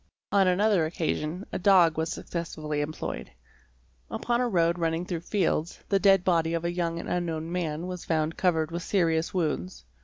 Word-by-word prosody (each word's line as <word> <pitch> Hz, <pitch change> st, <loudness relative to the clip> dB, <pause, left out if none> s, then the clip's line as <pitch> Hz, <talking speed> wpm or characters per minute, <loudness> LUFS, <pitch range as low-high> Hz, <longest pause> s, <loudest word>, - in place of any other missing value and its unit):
On 195 Hz, -2 st, +4 dB
another 185 Hz, -2 st, +3 dB
occasion 165 Hz, +1 st, -2 dB
a -, -, -3 dB
dog 180 Hz, -4 st, +5 dB
was 160 Hz, +1 st, -1 dB
successfully 155 Hz, -3 st, -4 dB
employed. 155 Hz, +2 st, -4 dB, 0.8 s
Upon 240 Hz, 0 st, 0 dB
a 245 Hz, -, +1 dB
road 170 Hz, -3 st, +2 dB
'rur 165 Hz, -1 st, +2 dB
ning 165 Hz, +2 st, -2 dB
through 175 Hz, -2 st, -3 dB
fields, 170 Hz, -2 st, -1 dB
the 195 Hz, -, +3 dB
dead 195 Hz, -2 st, +5 dB
body 165 Hz, -2 st, +2 dB
of 165 Hz, 0 st, -2 dB
a 170 Hz, -, -1 dB
young 170 Hz, -1 st, -1 dB
and -, -, -6 dB
unknown 165 Hz, -2 st, -2 dB
man 170 Hz, -1 st, -2 dB
yas 180 Hz, -1 st, -5 dB
found 160 Hz, 0 st, 0 dB
covered 165 Hz, -3 st, +1 dB
with 170 Hz, +1 st, -3 dB
serious 165 Hz, -4 st, +1 dB
wounds. 180 Hz, +1 st, -2 dB
170 Hz, 180 wpm, -27 LUFS, 160-185 Hz, 0.8 s, dog